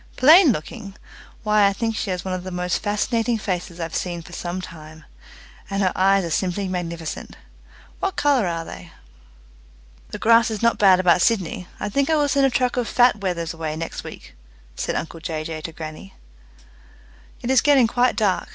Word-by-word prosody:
"Plain 310 +4 +7
looking! 195 +2 -6 0.5
Why, 210 -1 +4
I 200 - +1
think 225 +2 -2
she 210 - -3
has 180 -1 -3
one 185 - -2
of 185 -1 -4
the 185 - -6
most 180 0 -2
fascinating 225 +3 0
faces 180 -4 -4
I've 165 -1 -4
seen 175 -2 -3
for 175 - -13
some 175 +1 -4
time, 155 -3 -11 0.6
and 195 0 -1
her 185 - +2
eyes 195 +1 +3
are 165 - -5
simply 190 +3 -1
magnificent. 170 -3 -5 0.6
What 385 -2 -2
colour 275 -8 +2
are 165 -1 -3
they?" 90 - -11 1.2
"The - - -6
grass 230 +2 +4
is 220 0 -4
not 235 - +2
bad 190 -3 +6
about 180 -1 +4
Sydney. 185 -5 0
I - - -3
think 275 +8 0
I 320 - +3
will 295 -1 +2
send 275 -1 +3
a - - +1
truck 250 0 0
of 245 -2 0
fat 245 -2 +4
wethers 170 -4 -2
away 160 -2 -4
next 165 +1 -5
week," - - -11 0.4
said - - -3
uncle 165 0 -4
Jay 160 -1 -4
Jay 155 0 -6
to 165 - -6
grannie. 160 +4 -9 1.3
"It 245 - -1
is 260 -3 +5
getting 280 -4 +5
quite 245 +2 +1
dark. 205 -4 0
190 Hz, 190 wpm, -22 LUFS, 170-230 Hz, 1.3 s, Plain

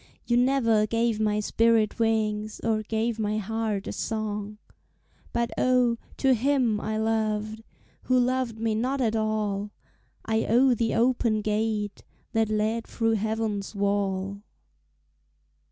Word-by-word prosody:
You 240 - +1
never 240 -4 +3
gave 230 0 0
my 210 -1 +1
spirit 225 0 +2
wings 215 -1 0
Or 220 -2 +1
gave 225 +1 -2
my 210 0 0
heart 215 -1 -2
a - - -4
song. 210 -1 -3 0.7
But 235 0 -1
oh, 250 -2 +3 0.2
to 265 -1 +3
him 245 -3 +1
I 215 0 -2
loved, 220 0 -1 0.4
Who 255 - +3
loved 250 -2 0
me 225 0 0
not 255 +5 -1
at 225 -3 +1
all, 210 -2 -1 0.6
I 220 0 0
owe 250 +3 +4
the 230 -1 0
open 235 -3 +2
gate 210 -1 -1 0.3
That 225 -1 +2
led 215 +2 0
through 225 -1 0
heaven's 220 -1 -2
wall. 200 -1 -1
220 Hz, 130 wpm, -26 LUFS, 210-230 Hz, 0.7 s, owe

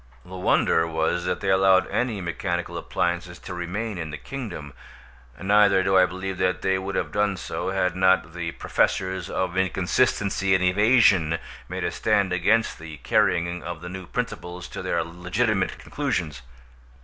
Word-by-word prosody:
The 90 - -12
wonder 85 -2 +2
was 80 +2 -1
that - - -2
they 95 - +1
allowed 95 0 +5
any 115 -5 -1
mechanical 85 0 -3
appliances 85 +1 -2
to - - -8
remain 95 +4 -4
in 80 -2 -4
the 75 - -6
kingdom, 90 - -7 0.7
neither 100 +1 +4
do 95 0 +2
I 90 -1 +6
believe 95 +1 -5
that 90 0 0
they 95 0 +2
would 95 0 -4
have - - -1
done 105 -1 +1
so, - - -4
had 90 -2 0
not 95 -3 +3
the 85 -1 -3
Professors 95 -1 0
of 95 -1 -2
Inconsistency 95 +1 +1
and 95 - +1
Evasion 95 -4 +4 0.3
made - - -4
a - - -1
stand 95 -3 +1
against 110 +6 +2
the 80 -1 -9
carrying 85 +6 +1
of 85 -2 -6
the 90 - -7
new 95 -1 -7
principles 90 +1 -5
to - - -6
their - - 0
legitimate 95 +4 -1
conclusions. 90 - -3
95 Hz, 160 wpm, -24 LUFS, 85-95 Hz, 0.7 s, I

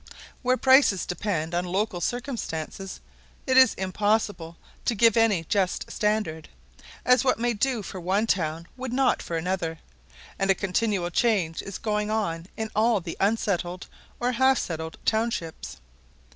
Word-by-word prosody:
Where 255 0 +2
prices 260 -9 +5
depend 175 -3 -2
on 175 +1 +1
local 185 0 -1
circumstances, 195 - -4 0.4
it 260 - +1
is 260 -2 +7
impossible 190 -3 -1 0.3
to 235 - +1
give 230 +1 +5
any 225 -7 +3
just 185 +2 -1
standard; 210 -7 -1 0.6
as 250 -1 +5
what 260 - +2
may 240 +1 0
do 235 0 0
for 185 -1 -7
one 195 +5 +1
town 165 -5 -1
would 255 -1 -5
not 265 0 +2
for 165 - -3
another, 165 -1 -2 0.6
and 195 0 0
a 195 - +5
continual 195 -2 -1
change 185 -6 +1
is 195 - -7
going 210 -1 -1
on 180 -6 -2
in 220 -1 -3
all 220 0 +3
the 170 -2 -6
unsettled 190 -4 0 0.3
or 245 +1 +1
half 260 +2 +3
settled 160 -1 -4
townships. 220 -7 -2
205 Hz, 145 wpm, -26 LUFS, 175-230 Hz, 0.6 s, is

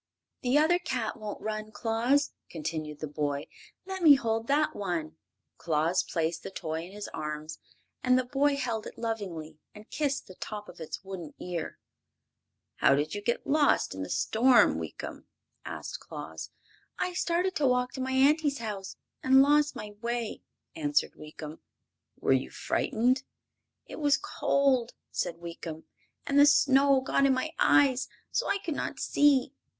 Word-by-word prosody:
"The 250 +3 +3
other 325 +4 +4
cat 255 -10 -2
won't 210 -1 -6
run, 215 0 -4
Claus," 235 +6 +1 0.2
continued 155 -2 -5
the 155 - -2
boy. 145 -1 -2 0.4
"Let 380 0 -5
me 305 -4 +9
hold 225 -3 -1
that 295 +2 +2
one." 165 -6 -3 0.4
Claus 165 +3 +1
placed 160 0 -2
the - - -6
toy 160 -3 -4
in 180 - -12
his 205 +1 -6
arms, 155 +1 -5 0.4
and 255 0 +4
the 255 - +1
boy 280 +3 +2
held 235 -5 -2
it - - -11
lovingly 180 -9 -4 0.2
and 210 +1 -14
kissed 285 -2 -1
the 185 - -12
tip 210 +2 -7
of - - -12
its 160 +4 -6
wooden 185 -5 -7
ear. 175 -3 -4 1.0
"How 140 - +5
did 150 +2 -1
you 205 - -3
get 235 +3 -1
lost 295 0 +3
in 95 - -6
the 95 - -4
storm, 240 +2 +4
Weekum?" - - -7 0.4
asked - - -6
Claus. - - -8 0.5
"I 360 - -1
started 355 +1 0
to 285 - +3
walk 250 0 +1
to 260 - -5
my 260 0 -2
auntie's 285 +2 +3
house 205 -4 -5 0.3
and 265 +1 +6
lost 295 0 +3
my 210 -3 -7
way," 235 -1 -3 0.3
answered 295 -2 +1
Weekum. 155 0 -9 0.6
"Were - - +3
you - - 0
frightened?" 250 +4 +1 0.6
"It - - -9
was 290 -2 +4
cold," 265 -4 +1 0.2
said 170 -2 -2
Weekum, 165 -2 -7 0.4
"and 280 0 +3
the 285 - +8
snow 275 -1 +5
got 275 +1 +2
in 265 - +3
my 285 +5 -2
eyes, 270 -4 +4 0.2
so - - 0
I 400 - +2
could 345 -5 -4
not - - -4
see. 285 -2 +3
235 Hz, 160 wpm, -29 LUFS, 170-280 Hz, 1.0 s, me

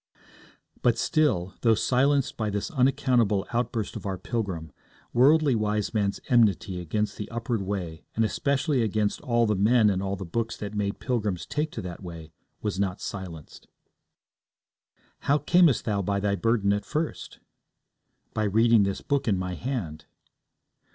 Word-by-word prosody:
But 120 -1 +3
still, 120 - +1
though 115 -2 +4
silenced 135 +4 +2
by 110 -2 -2
this 100 - -3
unaccountable 125 - +2
outburst 115 -2 -1
of - - -5
our 95 -1 -2
pilgrim, 95 - -4 0.4
Worldly 145 +3 +5
Wiseman's 105 -1 0
enmity 100 -6 +2
against 105 +6 -2
the 105 - -6
upward 115 -1 -2
way, 95 -5 -4
and 115 - +2
especially 140 +3 0
against 105 -1 0
all 120 -4 +2
the 105 - +2
men 105 +2 +4
and 95 -1 -1
all 100 0 -2
the 95 0 -6
books 110 +6 -3
that 105 0 -6
made 100 -1 -2
pilgrims 105 -8 -2
take 150 +1 -2
to 110 - -5
that 90 0 -7
way, 85 -3 -9 0.3
was 105 -2 -2
not 100 -1 -1
silenced. 85 -6 -8 1.5
'How 145 - +2
camest 160 0 +4
thou 105 -3 0
by 100 +1 -1
thy 100 0 0
burden 100 -1 +2
at 105 - -1
first?' 155 +1 -4 1.0
By 110 - 0
reading 110 +2 +4
this 100 -1 -1
Book 140 -3 -1
in 100 -4 +2
my 90 0 -3
hand.' 90 - -4
105 Hz, 150 wpm, -26 LUFS, 95-125 Hz, 1.5 s, Worldly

